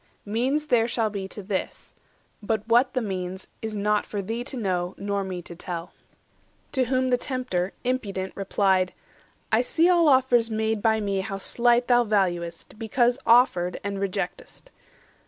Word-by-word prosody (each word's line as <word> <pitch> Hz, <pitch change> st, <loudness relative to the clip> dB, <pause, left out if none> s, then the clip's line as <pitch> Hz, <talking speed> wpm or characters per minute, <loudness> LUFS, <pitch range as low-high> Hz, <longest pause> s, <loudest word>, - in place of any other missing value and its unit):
Means 255 Hz, +8 st, 0 dB
there 240 Hz, -6 st, +3 dB
shall 225 Hz, -3 st, 0 dB
be 195 Hz, -2 st, -4 dB
to 205 Hz, +1 st, -9 dB
this; 190 Hz, 0 st, -4 dB, 0.5 s
but 215 Hz, 0 st, -2 dB
what 240 Hz, +3 st, +4 dB
the 255 Hz, -, +2 dB
means 185 Hz, -2 st, -4 dB, 0.2 s
Is 220 Hz, -1 st, -4 dB
not 210 Hz, +1 st, +1 dB
for 205 Hz, -, -5 dB
thee 225 Hz, +5 st, -3 dB
to 265 Hz, -, -5 dB
know, 185 Hz, -5 st, -1 dB
nor 200 Hz, 0 st, -2 dB
me 185 Hz, -2 st, -5 dB
to 170 Hz, -, -9 dB
tell." 170 Hz, 0 st, -6 dB, 0.8 s
To 260 Hz, -2 st, +1 dB
whom 255 Hz, +1 st, +1 dB
the 250 Hz, -, +4 dB
Tempter, 250 Hz, -10 st, -2 dB
impudent, 200 Hz, -7 st, -2 dB
replied:— 190 Hz, -2 st, +1 dB, 0.6 s
"I 220 Hz, +1 st, +4 dB
see 325 Hz, +7 st, +2 dB
all 345 Hz, -3 st, +5 dB
offers 255 Hz, -4 st, +4 dB
made 220 Hz, -1 st, -1 dB
by 220 Hz, 0 st, +2 dB
me 200 Hz, -1 st, -1 dB
how 195 Hz, 0 st, -3 dB
slight 240 Hz, +4 st, +2 dB
Thou 245 Hz, -1 st, +5 dB
valuest, 180 Hz, -4 st, -1 dB
because 240 Hz, +2 st, +1 dB
offered, 225 Hz, -7 st, +4 dB
and 200 Hz, -1 st, -3 dB
reject'st. -, -, -4 dB
215 Hz, 160 wpm, -25 LUFS, 190-245 Hz, 0.8 s, all